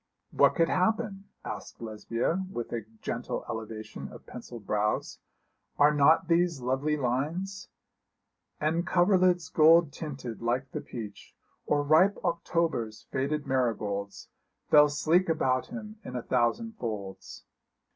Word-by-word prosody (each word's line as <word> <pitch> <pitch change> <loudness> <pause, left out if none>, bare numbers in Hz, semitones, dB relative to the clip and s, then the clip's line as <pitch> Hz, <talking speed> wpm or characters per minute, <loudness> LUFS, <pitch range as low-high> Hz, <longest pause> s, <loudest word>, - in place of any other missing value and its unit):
'What - - +4
could 165 -1 +3
happen?' 200 +1 0 0.2
asked - - -7
Lesbia, 115 - -2
with 120 -7 -5
a 115 -3 -4 0.2
gentle - - -3
elevation 110 -1 -6
of - - -13
pencilled 120 -3 -10
brows. 105 +1 -1 0.6
'Are 150 +1 +5
not 155 +4 +4
these 170 -2 +2
lovely 135 +5 0
lines 160 +10 -2 0.9
"And 165 +3 0
coverlids 180 -2 +3
gold 160 -1 +6
tinted 135 -8 -6
like 125 +3 -1
the - - -4
peach, 105 -4 -9 0.3
Or 145 0 +2
ripe 160 +7 +4
October's 165 -10 -1
faded 140 +3 -1
marigolds, 105 -6 -2 0.4
Fell 150 0 +8
sleek 165 +5 +2
about 130 -5 +1
him 215 -2 -8
in 125 - -7
a 125 - -3
thousand 225 - 0
folds." 105 -5 -6
145 Hz, 125 wpm, -29 LUFS, 120-170 Hz, 0.9 s, Fell